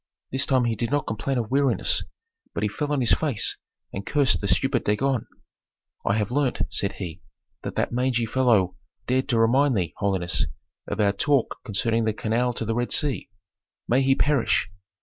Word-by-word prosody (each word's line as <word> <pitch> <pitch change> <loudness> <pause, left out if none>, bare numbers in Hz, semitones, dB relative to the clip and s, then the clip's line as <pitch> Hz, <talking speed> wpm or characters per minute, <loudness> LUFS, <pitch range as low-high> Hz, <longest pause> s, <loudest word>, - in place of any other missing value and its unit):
This 135 +2 0
time 130 -3 +3
he 115 -1 0
did 115 +1 -2
not 145 +1 0
complain 115 +5 -2
of 115 -2 -2
weariness, 140 - +2 0.5
but - - -1
he - - +2
fell 150 -1 -3
on 145 -2 +1
his 115 -5 +2
face 135 -1 0 0.4
and 95 - -4
cursed 135 - +2
the - - -1
stupid - - +1
Dagon. 125 +4 0 0.8
"I 100 - +1
have 105 +1 -1
learned," 140 -1 +1
said 100 - 0
he, 85 -3 -7 0.4
"that - - -6
that - - 0
mangy 125 -1 +1
fellow 110 -7 +2 0.3
dared 130 +1 0
to 120 - +2
remind 130 +3 +4
thee, 85 -3 -1
holiness, 95 -4 0 0.4
of 105 - -4
our 100 -1 +4
talk 140 +3 +1
concerning 115 +1 0
the 110 - +1
canal 115 +3 0
to 115 - -3
the 115 - 0
Red 120 +1 -1
Sea. 145 -3 0 0.6
May 125 +3 +3
he 135 0 +3
perish! 135 -10 +1
120 Hz, 185 wpm, -25 LUFS, 105-135 Hz, 0.8 s, remind